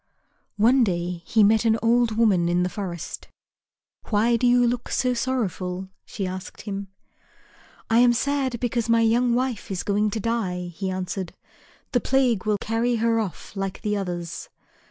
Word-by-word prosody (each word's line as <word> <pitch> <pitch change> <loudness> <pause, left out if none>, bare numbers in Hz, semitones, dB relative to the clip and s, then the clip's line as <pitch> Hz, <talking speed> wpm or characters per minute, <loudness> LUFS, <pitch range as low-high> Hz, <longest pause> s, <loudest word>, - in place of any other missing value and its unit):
One 240 +5 +5
day 175 -3 -2
he 220 -1 +4
met 220 +2 +4
an 225 -1 +3
old 230 -1 +2
woman 190 -7 +3
in 175 +1 +2
the 180 - 0
forest. 180 -4 -6 0.8
"Why 225 +3 +3
do 245 +2 +2
you 245 0 +5
look 240 0 -1
so 250 -1 +1
sorrowful?" 190 -7 -2 0.2
she 200 - -4
asked 185 0 -6
him. 200 -1 -5 1.0
"I 225 +1 +4
am 245 0 +6
sad 265 -1 -1
because 235 -1 -1
my 230 0 +4
young 235 +2 +3
wife 250 -3 -2
is 190 -3 -3
going 210 +1 +1
to 220 - -3
die," 190 -6 -2
he 190 +3 -3
answered; 185 -1 -4 0.6
"the 245 -3 +2
plague 250 -7 +1
will 210 -1 +2
carry 230 +3 0
her 230 0 +2
off 205 -1 -5
like 195 -1 -4
the 210 -1 0
others." 175 -4 -4
220 Hz, 165 wpm, -24 LUFS, 190-235 Hz, 1.0 s, am